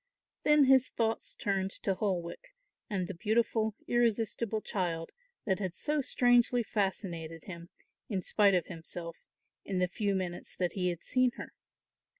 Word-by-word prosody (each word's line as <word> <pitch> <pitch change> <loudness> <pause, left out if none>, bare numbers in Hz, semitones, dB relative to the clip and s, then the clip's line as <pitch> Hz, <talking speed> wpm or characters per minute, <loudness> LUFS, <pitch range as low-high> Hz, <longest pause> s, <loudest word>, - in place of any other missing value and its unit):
Then 300 -1 +5
his 265 -1 +5
thoughts 225 -1 -1
turned 195 -1 0
to 195 - +2
Holwick 195 - -3 0.3
and 190 -4 -1
the 195 - -5
beautiful 220 +2 +1
irresistible 230 -2 +1
child 175 -6 -2 0.3
that 190 -3 +1
had 185 -4 -3
so 300 +6 0
strangely 245 -2 +3
fascinated 175 -6 -2
him, 170 -2 -9 0.4
in 190 -5 -1
spite 200 -2 +4
of 175 - +1
himself, 170 -1 -7 0.5
in 190 - -3
the 180 0 +2
few 200 +2 -1
minutes 180 -2 -4
that 180 -1 0
he 180 -2 0
had 175 -1 -5
seen 255 -1 +2
her. - - -8
200 Hz, 150 wpm, -31 LUFS, 180-230 Hz, 0.5 s, Then